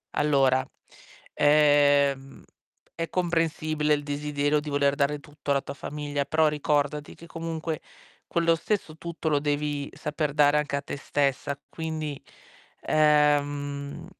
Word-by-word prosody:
Allora, 135 -3 +3 0.7
ehm, 145 -2 +3 0.5
è 165 -1 -4
comprensibile 155 -3 0
il 145 -1 -1
desiderio 145 0 0
di 150 - -6
voler 140 0 +2
dare 145 +1 0
tutto 145 -1 -6
alla 140 -1 +2
tua - - -7
famiglia, 145 0 -4
però 155 +2 +3
ricordati 150 0 -1
che 170 - -14
comunque 165 -1 -4 0.5
quello 170 -1 +2
stesso 165 -3 -3
tutto 170 -1 -4
lo 145 -2 +2
devi 145 -1 -2
saper 150 -1 -3
dare 145 0 +4
anche 150 -1 -1
a 140 - -1
te 145 - -6
stessa. 140 0 -1
Quindi, 155 -3 -5 0.6
ehm, 145 -2 +1
150 Hz, 125 wpm, -26 LUFS, 145-155 Hz, 0.7 s, dare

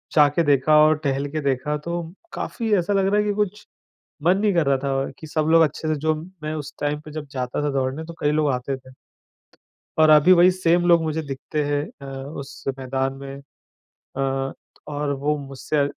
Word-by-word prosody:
जा 150 -1 +7
के 170 - +3
देखा 145 +1 +4
और 155 0 +4
टहल 140 0 0
के 155 - -2
देखा, 140 +2 0
तो 170 +2 -5 0.2
काफ़ी 225 -3 -2
ऐसा 180 +3 0
लग 195 -1 +2
रहा 205 +1 +2
है 210 - +3
कि 205 -1 0
कुछ 210 0 -2 0.6
मन 180 +4 +4
नहीं 205 0 +2
कर 170 -4 +2
रहा 140 0 +3
था, 135 0 -1
कि 160 - -9
सब 155 0 -1
लोग 165 0 +7
अच्छे 155 +1 -1
से 155 - +2
जो 155 +1 +2 0.3
मैं 155 0 -3
उस 145 -2 -6
टाइम 145 0 -1
पे 155 - -12
जब 155 -1 -6
जाता 130 +1 -3
था 145 - +1
दौड़ने 135 +3 -1
तो 170 +1 -9
कई 145 - +2
लोग 150 -1 +2
आते 125 +2 -2
थे। 130 0 -16 1.1
और 155 0 +6
अभी 155 +4 +7
वहीं 180 +1 +7
सेम 175 -1 +2
लोग 170 -1 +6
मुझे 160 0 -1
दिखते 145 +1 -3
हैं 145 0 0 0.2
अ, 140 - -8 0.3
उस 140 0 -10
मैदान 135 0 -2
में। 135 0 -8 0.8
अ, 135 0 -1 0.4
और 145 0 -2
वो 145 +2 0
मुझसे 140 +1 -1
150 Hz, 205 wpm, -23 LUFS, 135-165 Hz, 1.1 s, जा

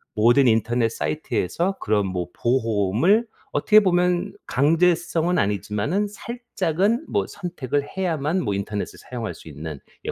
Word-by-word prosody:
모든 120 +5 +5
인터넷 115 +1 +2
사이트에서 90 - -1
그런 105 -1 +1
뭐 90 -2 -3
보험을 120 - +2 0.2
어떻게 215 0 +5
보면 180 -2 +1
강제성은 165 +4 +2
아니지만은 105 - 0
살짝은 220 - -1
뭐 - - +1
선택을 145 -6 -3
해야만 170 -1 0
뭐 105 -4 -1
인터넷을 100 +1 -4
사용할 115 -7 -5
수 80 - -15
있는 75 0 -7 0.3
예 - - -1
135 Hz, 310 characters per minute, -23 LUFS, -, 0.3 s, 모든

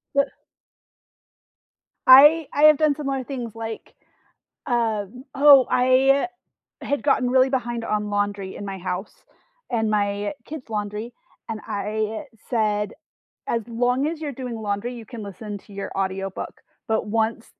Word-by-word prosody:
Uh 280 - +5 1.8
I 295 +4 +8
I 290 - +1
have 305 -1 +8
done 305 -2 +3
similar 275 -3 -3
things 245 -5 -6
like, 225 -1 -7 0.7
um 230 -1 -1
oh, 275 -2 +7
I 265 +5 +4 0.5
had 285 - -2
gotten 255 -3 +2
really 260 +1 +4
behind 240 -3 -2
on 210 0 -1
laundry 205 -2 -2
in 205 - -7
my 195 -1 -5
house 185 +2 -4 0.6
and 220 -3 0
my 205 +1 0
kids' 295 -6 -8
laundry. 210 +2 -4 0.4
And 220 -1 -3
I 215 +3 -2 0.3
said, 210 -3 0 0.5
"As 230 -1 -1
long 245 +4 +1
as 320 0 -3
you're 290 -3 -4
doing 250 -2 -6
laundry, 215 +3 -3
you 230 -3 -10
can 235 -2 -8
listen 205 +1 -7
to 205 - -18
your 200 0 -5
audiobook. 195 0 -3 0.3
But 220 -1 0
once 225 +1 -1
230 Hz, 140 wpm, -23 LUFS, 210-260 Hz, 1.8 s, I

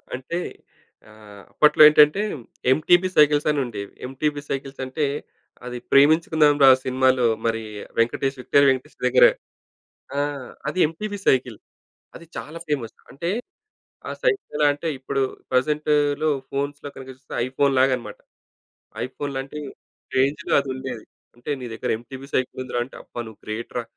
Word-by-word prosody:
అంటే 130 +7 -5 0.7
ఆహ్, 105 -2 -14
అప్పట్లో 150 0 +4
ఏంటంటే 150 +5 +6 0.5
ఎంటిపీ 175 +6 +4
సైకిల్స్ 150 0 +5
అని 150 -1 +1
ఉండేవి. 100 -4 -7
ఎంటిపీ 145 +3 -2
సైకిల్సంటే 135 +1 -3 0.6
అది 125 0 -5
ప్రేమించుకుందాం 155 +1 +5
రా 135 - +10 0.2
సినిమాలో 130 -1 +2 0.2
మరి 115 0 0 0.4
వెంకటేష్, 135 +4 0
విక్టరి 140 +2 +4
వెంకటేష్ 130 -1 -2
దగ్గర 125 0 +6 0.9
ఆ! - - +2 0.5
అది 150 - -3
ఎంటివీ 205 +6 -5
సైకిల్ 125 -4 +2 0.6
అది 170 - -11
చాలా 155 +3 -7
ఫేమస్. 135 -7 -2 0.2
అంటే 170 +5 -4 0.8
ఆ - - -3
సైకిల్ 460 - 0
ఎలా 150 - +3
అంటే 145 +3 -5
ఇప్పుడు 135 +1 -2 0.3
ప్రజెంట్‌లో 150 +2 +1 0.2
ఫోన్స్‌లో 145 +1 -4
కనుక 130 - -10
చూస్తే 130 - -13
ఐఫోన్‌లాగనమాట. 130 -1 +1 0.9
ఐఫోనులాంటి 135 +2 -5 0.6
రేంజ్‌లో 140 +5 +1
అది 140 -1 -4
ఉండేది. 130 -4 -6 0.3
అంటే 120 - -10
నీ - - -5
దగ్గర 110 - -4
ఎంటివీ 130 +3 -10
సైకిల్ 130 0 -1
ఉందిరా 120 -1 -2
అంటే 130 - -15
అబ్బా! - - -9
నువ్వు 110 - -13
గ్రేట్‌రా 115 +2 -4
135 Hz, 130 wpm, -23 LUFS, 130-150 Hz, 0.9 s, రా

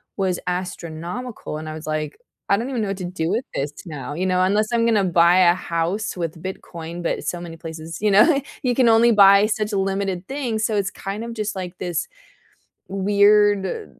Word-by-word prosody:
was 190 -3 -1
astronomical, 180 +3 -5
and 155 0 -7
I 155 - -5
was 155 0 -8
like, 155 - -3 0.3
"I - - +5
don't 235 +6 -3
even 250 -4 -2
know 200 - -2
what 195 - -3
to 185 - -6
do 175 -2 -3
with 225 +6 0
this 145 +2 -2
now," 150 -3 -6
you 175 +5 -2
know, 185 0 +2
unless 210 +3 +2
I'm 235 -1 +2
gonna 220 -4 +3
buy 175 0 +4
a 175 -1 +6
house 185 +5 -2
with 165 -2 -4
Bitcoin, 170 -2 -7
but - - -2
so 175 - -3
many 165 -1 -8
places, 160 0 -7
you 210 - +2
know, 275 +9 +5 0.2
you 250 -3 +1
can 250 -2 +4
only 230 +1 +5
buy 200 -1 +7
such 215 -1 -2
a - - +1
limited 195 -1 -2
things, 245 -6 -2
so 220 - 0
it's 195 -2 -1
kind 200 +5 -5
of, 235 - -6
just 215 -2 -3
like, 180 -1 -6
this 175 -2 -2 0.8
weird, 205 - +2
190 Hz, 205 wpm, -22 LUFS, 170-215 Hz, 0.8 s, buy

